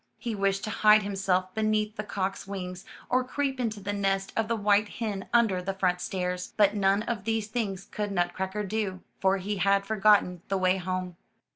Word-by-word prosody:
He 235 -3 -4
wished 195 -1 0
to 215 - -3
hide 215 -1 +5
himself 190 -2 0
beneath 215 -1 0
the 210 - -3
cock's 195 -2 -3
wings 180 -2 -6 0.2
or 255 +1 +2
creep 270 +1 -2
into 220 -4 -2
the 205 +1 -3
nest 195 -1 -1
of 225 -1 +1
the 230 - 0
white 205 0 +3
hen 205 -4 -4
under 225 -6 +3
the 190 +1 -3
front 180 -2 +1
stairs, 180 -1 -3
but 205 -1 +5
none 200 0 +2
of 230 -4 -3
these 225 0 0
things 205 -4 -3
could 210 -1 -4
Nutcracker 190 +2 -1
do, 200 -2 -2 0.2
for 195 0 +3
he 200 +2 -3
had 195 +1 +2
forgotten 200 -4 +3
the 195 - 0
way 185 0 +2
home. 185 -1 -3
200 Hz, 190 wpm, -28 LUFS, 190-215 Hz, 0.2 s, hide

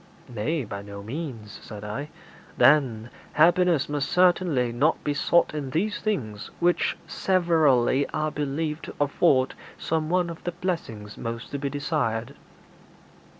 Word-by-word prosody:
'Nay; 135 +7 -2
by 100 -1 -6
no 100 0 -9
means,' 115 -4 -6
said 105 -2 -9
I. 125 +8 -5 0.5
'Then, 125 -6 +4 0.2
happiness 170 -1 +4
must 145 -1 -2
certainly 175 -9 +3
not 140 +7 +1
be 145 - 0
sought 170 +4 +2
in 145 -3 -4
these 195 +10 -1
things 110 - -3
which 175 0 +2
severally 155 -8 +2
are 155 0 -1
believed 150 +2 -3
to - - -9
afford 140 -2 +3 0.2
some 155 -1 -1
one 175 -1 +1
of 165 - -10
the 175 - -3
blessings 115 - -4
most 115 +1 -5
to 140 - -3
be 140 0 -2
desired.' 140 -5 -2
145 Hz, 140 wpm, -26 LUFS, 120-165 Hz, 0.5 s, Then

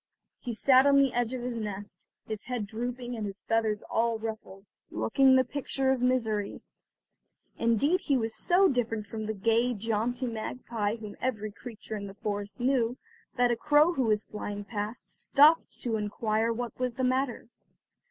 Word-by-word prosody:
He 245 - -4
sat 260 +4 +5
on 280 0 +6
the 275 -2 +3
edge 240 -1 0
of 245 - -5
his 245 -1 -3
nest, 205 -2 -6 0.2
his 215 -1 -5
head 245 -4 -3
drooping 245 +3 -4
and 220 - -4
his 200 -1 -6
feathers 220 -2 0
all 230 0 0
ruffled, 215 -3 -7 0.2
looking 265 +2 +4
the 260 - +5
picture 270 0 -1
of 260 -2 0
misery. 225 -5 0 1.0
Indeed 255 - +2
he 275 - +2
was 225 -2 -2
so 375 +2 +4
different 230 - -1
from 215 +1 -5
the 220 - -2
gay, 230 +4 +2
jaunty 230 +4 -1
magpie 225 -2 -3
whom 215 -3 -9
every 215 -5 -2
creature 220 0 -8
in 200 -1 -5
the 195 - -10
forest 205 -1 -4
knew, 245 -1 +1 0.4
that 245 -1 +3
a - - +2
crow 300 +7 +4
who 265 -6 0
was 215 -1 +2
flying 205 -1 -6
past, 210 +2 -5
stopped 305 +3 +4
to 230 -3 0
inquire 215 +2 0
what 240 +1 -4
was 250 -2 -1
the 260 - -2
matter. 255 -2 0
230 Hz, 170 wpm, -29 LUFS, 215-255 Hz, 1.0 s, on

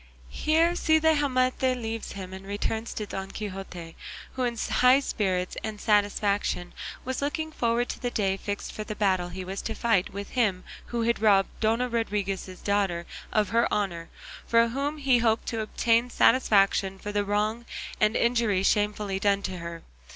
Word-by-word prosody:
Here 325 - +2
Cide 315 -2 +3
Hamete 260 -4 +2
leaves 225 -1 -4
him, 190 -2 -7
and 190 0 -8
returns 210 +3 -3
to 215 - -3
Don 195 -1 -5
Quixote, 190 -5 -7 0.4
who 260 - -2
in 240 -1 -1
high 250 +4 +4
spirits 185 -8 -1
and 215 -1 -4
satisfaction 205 -3 +1 0.3
was 260 +1 -3
looking 315 +2 -2
forward 235 -3 0
to - - -5
the 245 - -1
day 195 -5 0
fixed 200 +1 -5
for 215 - -5
the 210 0 -6
battle 185 -4 +1
he 185 +1 -6
was 190 +1 -4
to 225 - -4
fight 220 -5 +1
with 200 +1 -7
him 205 -7 +1 0.2
who 235 -1 -2
had 235 0 +1
robbed 200 -3 +4
Dona 230 +3 +1
Rodriguez's 200 -5 -2
daughter 195 -4 0 0.3
of 215 -1 +2
her 235 +1 +2
honour, 175 -5 -2 0.4
for 230 0 +4
whom 280 +5 -2
he 270 -4 +3
hoped 225 -1 +1
to 225 -1 -2
obtain 230 +2 +1
satisfaction 195 -6 +3
for 205 +2 -6
the 205 0 +1
wrong 210 +3 -1 0.3
and 215 +2 +3
injury 230 -5 +2
shamefully 205 -1 +1
done 200 -1 +2
to 185 - -3
her. 170 0 -7
215 Hz, 170 wpm, -27 LUFS, 195-235 Hz, 0.4 s, high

